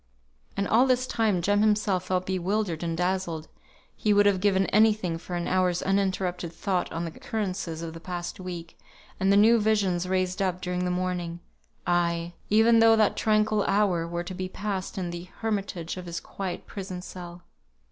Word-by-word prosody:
And 200 0 0
all 245 +4 +4
this 255 0 +2
time 220 -8 +1
Jem 205 +2 +3
himself 205 -3 +2
felt 185 0 0
bewildered 190 -1 -1
and 165 -1 -2
dazzled; 180 -3 -1 0.5
he 210 - +2
would 205 0 +5
have 200 -2 +4
given 195 -1 +3
any 215 +1 +6
thing 175 -6 -3
for 175 +1 -6
an 175 -1 -2
hour's 180 -1 +1
uninterrupted 185 -3 0
thought 180 +2 -2
on 165 +1 -3
the 165 - -5
occurrences 185 -5 -4
of 165 -1 -5
the 165 - -8
past 175 +1 -5
week, 175 -3 -7 0.4
and 190 +1 +3
the 200 - +5
new 225 +3 +6
visions 195 -5 +1
raised 185 0 0
up 185 -2 0
during 180 0 -2
the - - 0
morning; 180 -1 -2 0.5
aye, 170 -1 0 0.2
even 225 +2 +5
though 225 0 +7
that 215 -2 +3
tranquil 215 -1 +2
hour 190 -5 +2
were 170 +1 -3
to 180 - -7
be 185 0 -4
passed 195 -1 -4
in 180 -2 -2
the 175 0 -6 0.2
hermitage 195 -6 -2
of 180 -1 -7
his 170 0 -4
quiet 190 -3 -6
prison 185 -3 -6
cell. 175 -1 -9
185 Hz, 185 wpm, -27 LUFS, 175-205 Hz, 0.5 s, though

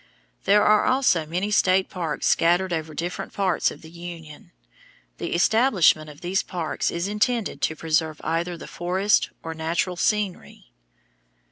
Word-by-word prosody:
There 210 +1 +5
are 215 0 +4
also 255 - +2
many 180 +6 -2
state 190 -2 +3
parks 165 -5 -4
scattered 175 +2 +2
over 160 -1 -4
different 175 +3 -4
parts 190 -4 +1
of - - -11
the 160 - -12
Union. 170 -3 -10 0.7
The - - -3
establishment 185 - +3
of 145 -1 -13
these 185 +2 0
parks 170 -4 -3
is 170 +2 -2
intended 210 - -1
to 155 - 0
preserve 155 -1 -1
either 170 +2 -2
the - - -9
forests 190 +4 +1
or 165 - -5
natural 170 +3 -2
scenery. 205 0 -2
175 Hz, 145 wpm, -24 LUFS, 160-195 Hz, 0.7 s, There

